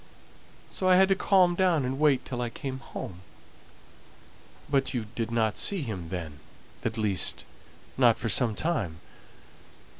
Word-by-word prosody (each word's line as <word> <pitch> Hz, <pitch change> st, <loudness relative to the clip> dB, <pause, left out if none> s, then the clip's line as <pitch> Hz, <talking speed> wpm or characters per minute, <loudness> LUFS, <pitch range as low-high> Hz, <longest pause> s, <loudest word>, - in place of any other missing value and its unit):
So 185 Hz, -, -1 dB
I 185 Hz, -, +7 dB
had 190 Hz, +1 st, +5 dB
to 195 Hz, -, +4 dB
calm 185 Hz, -2 st, +3 dB
down 175 Hz, -6 st, +2 dB
and 130 Hz, +2 st, -3 dB
wait 150 Hz, -4 st, +3 dB
till 125 Hz, -2 st, -4 dB
I 120 Hz, -, -2 dB
came 130 Hz, +2 st, -6 dB
home." 90 Hz, -8 st, -8 dB, 1.5 s
"But 135 Hz, -2 st, 0 dB
you 115 Hz, -3 st, -2 dB
didn't 115 Hz, -2 st, -1 dB
see 195 Hz, -6 st, +1 dB
him 95 Hz, -9 st, -5 dB
then; 80 Hz, -5 st, -6 dB, 0.4 s
at 115 Hz, 0 st, -2 dB
least, 100 Hz, -5 st, 0 dB, 0.5 s
not -, -, +5 dB
for -, -, -4 dB
some 115 Hz, -4 st, +3 dB
time?" 110 Hz, -, -2 dB
125 Hz, 145 wpm, -27 LUFS, 110-170 Hz, 1.5 s, I